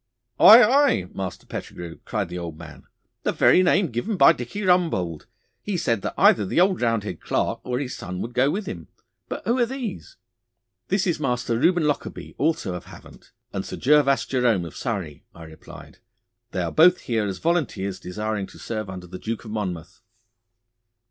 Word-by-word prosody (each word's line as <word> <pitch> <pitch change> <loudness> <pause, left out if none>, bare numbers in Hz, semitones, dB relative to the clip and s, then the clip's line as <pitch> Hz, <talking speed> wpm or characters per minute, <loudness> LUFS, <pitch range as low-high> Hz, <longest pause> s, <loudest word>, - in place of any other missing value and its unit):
'Aye, 235 +3 +10
aye, 260 - +3
Master 95 -1 -6
Pettigrue,' 85 -1 -8
cried 105 -5 -2
the 90 +1 -7
old 85 -3 -7
man. 75 -5 -12 0.3
'The - - -1
very 185 - +5
name 180 -3 +2
given 185 - -2
by 140 - +7
Dicky 125 - -6
Rumbold. 160 - +1 0.3
He 205 -3 -3
said 115 - 0
that - - -4
either 105 - +5
the 100 - 0
old 185 +1 +3
Roundhead 115 -3 -1
Clarke - - -1
or 125 -1 -2
his 130 -1 -4
son 90 0 -6
would 115 +4 -5
go 130 +3 +3
with 195 +7 -2
him. 85 - -7 0.4
But - - -6
who 235 +5 +1
are 240 - +4
these?' 255 - -6 0.7
'This 195 0 +1
is 170 -4 0
Master 125 -4 -1
Reuben 175 +3 +3
Lockarby, 150 -1 -3
also 145 - 0
of 90 - -7
Havant, - - -15 0.2
and - - -3
Sir - - -7
Gervas 140 0 +3
Jerome 120 -9 +1
of 85 - -10
Surrey,' 95 -11 -4
I 85 - -11
replied. 80 -1 -13 0.5
'They - - -2
are - - -3
both 175 +3 +5
here 110 -3 -1
as 95 - -4
volunteers 110 - -1
desiring 105 +2 -4
to - - -15
serve 110 -3 -5
under 90 -1 -7
the 90 +1 -9
Duke 115 +1 -5
of 110 - -8
Monmouth. 90 -6 -5
115 Hz, 180 wpm, -24 LUFS, -, 0.7 s, Aye